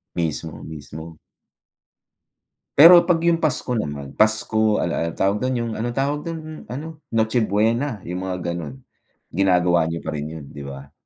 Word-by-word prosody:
Mismo, 80 Hz, -1 st, -3 dB
mismo. 80 Hz, +1 st, -9 dB, 1.6 s
Pero 170 Hz, +4 st, +9 dB
'pag 170 Hz, -3 st, +2 dB
yung 170 Hz, 0 st, +3 dB
Pasko 135 Hz, -6 st, 0 dB
naman, 70 Hz, -8 st, -5 dB
Pasko, 110 Hz, 0 st, +2 dB
al 85 Hz, -, 0 dB
al 85 Hz, 0 st, -1 dB
tawag 100 Hz, +2 st, +1 dB
dun, 130 Hz, +4 st, -1 dB
yung 115 Hz, -1 st, -3 dB
ano 120 Hz, +2 st, -2 dB
tawag 140 Hz, +3 st, -1 dB
dun, 155 Hz, -2 st, -7 dB
ano? 155 Hz, +6 st, -7 dB, 0.2 s
Noche 110 Hz, +2 st, +1 dB
Buena, 110 Hz, +4 st, 0 dB
yung 90 Hz, +1 st, -5 dB
mga 90 Hz, -2 st, -3 dB
gano'n, 75 Hz, -6 st, -7 dB, 0.5 s
ginagawa 90 Hz, -2 st, +3 dB
niyo 80 Hz, +1 st, -3 dB
pa -, -, -5 dB
rin 75 Hz, -1 st, -3 dB
'yon, 80 Hz, -3 st, -8 dB
'di 70 Hz, -, -9 dB
ba? 70 Hz, 0 st, -9 dB
105 Hz, 155 wpm, -22 LUFS, 80-130 Hz, 1.6 s, Pero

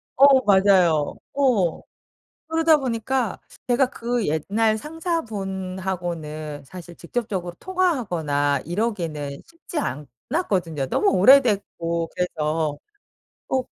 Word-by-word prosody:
어 275 Hz, -1 st, +7 dB
맞아요. 190 Hz, -6 st, +4 dB, 0.2 s
어. 235 Hz, -, +2 dB, 0.7 s
그러다 325 Hz, -1 st, +4 dB
보니까 250 Hz, -3 st, -1 dB, 0.3 s
제가 250 Hz, +1 st, +3 dB
그 235 Hz, -1 st, -2 dB
옛날 210 Hz, +9 st, +1 dB
상사분하고는 190 Hz, -, -4 dB
사실 175 Hz, +3 st, -11 dB
직접적으로 185 Hz, -2 st, -4 dB
통화하거나 175 Hz, -, 0 dB
이러기는 170 Hz, -7 st, -3 dB
쉽지 335 Hz, 0 st, -10 dB, 0.5 s
않았거든요 175 Hz, -, -1 dB
너무 -, -, +2 dB
오래됐고 195 Hz, -7 st, +3 dB
그래서. 155 Hz, -3 st, -1 dB, 0.7 s
어 260 Hz, -1 st, +1 dB
195 Hz, 240 characters per minute, -23 LUFS, 165-255 Hz, 0.7 s, 어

